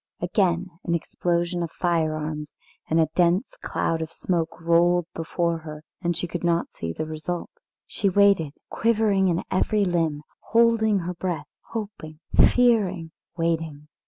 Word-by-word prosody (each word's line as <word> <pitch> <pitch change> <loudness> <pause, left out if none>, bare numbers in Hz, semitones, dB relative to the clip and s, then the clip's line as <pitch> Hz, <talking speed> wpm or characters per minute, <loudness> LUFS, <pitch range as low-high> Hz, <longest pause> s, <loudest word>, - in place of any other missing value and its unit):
Again 180 0 +1
an 170 - 0
explosion 175 +1 -1
of 170 - -2
firearms 155 -3 -1 0.3
and 160 - +3
a 160 -2 +3
dense 180 - +2
cloud 165 -1 -1
of 160 0 -4
smoke 165 -1 -2
rolled 170 +1 +3
before 165 0 -1
her 155 -1 -9 0.2
and 175 -1 0
she - - -1
could 175 0 -5
not 170 0 +1
see 85 - -4
the 155 - -4
result. 155 +3 -4 0.3
She 200 - 0
waited, 195 -6 +4 0.2
quivering 215 -4 +2
in 170 -1 0
every 205 +2 +2
limb, 165 -4 0 0.2
holding 230 -2 +3
her 180 +1 -3
breath 175 -1 -4 0.2
hoping, 200 -9 -6 0.3
fearing, 200 -9 +2 0.3
waiting. 160 -3 -2
170 Hz, 140 wpm, -25 LUFS, 160-190 Hz, 0.3 s, waited